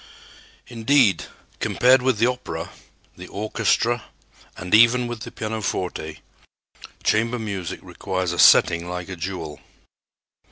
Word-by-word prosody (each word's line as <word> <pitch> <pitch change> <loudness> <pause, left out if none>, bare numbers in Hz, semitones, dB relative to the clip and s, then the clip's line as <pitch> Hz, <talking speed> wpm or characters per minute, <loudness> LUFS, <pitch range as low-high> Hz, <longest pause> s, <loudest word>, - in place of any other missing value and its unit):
Indeed, 120 -2 +2 0.3
compared 125 +1 +3
with 130 -3 +1
the 115 - +3
opera, 125 0 -4 0.4
the 90 0 -10
orchestra 115 +3 -1 0.5
and 90 +2 -6
even 120 +3 +6
with 120 -1 -5
the - - -8
pianoforte, 100 -7 -4 0.8
chamber 115 +3 +1
music 100 -6 -5
requires 95 0 -3
a 85 - -5
setting 85 +1 +5
like 90 0 -5
a 95 - -5
jewel. 85 -4 -6
110 Hz, 115 wpm, -22 LUFS, 90-120 Hz, 0.8 s, even